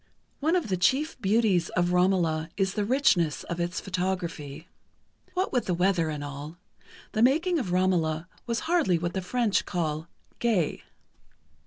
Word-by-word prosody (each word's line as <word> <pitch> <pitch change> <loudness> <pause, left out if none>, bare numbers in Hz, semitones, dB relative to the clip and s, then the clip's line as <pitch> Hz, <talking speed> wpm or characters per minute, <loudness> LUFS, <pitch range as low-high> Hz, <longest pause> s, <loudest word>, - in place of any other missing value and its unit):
One 320 +5 +2
of 345 -11 0
the 185 - +1
chief 265 - +1
beauties 200 -4 +2
of 175 0 +1
"Romola" 175 -3 +2
is 195 -1 +1
the 210 - -1
richness 200 - +2
of 170 0 -5
its 175 +1 -1
photography. 175 -5 -3 0.7
What 370 +1 0
with 245 - 0
the 180 - +1
weather 180 -2 +2
and 150 -2 -4
all, 145 +3 -7 0.5
the 220 - -1
making 325 +8 +3
of 195 -10 -3
"Romola" 175 -3 +1 0.2
was 235 0 -1
hardly 320 - +2
what 170 +1 -3
the 190 - -2
French 225 +2 +1
call 160 -2 -2 0.3
"gai." 215 -10 +1
185 Hz, 155 wpm, -27 LUFS, 170-230 Hz, 0.7 s, making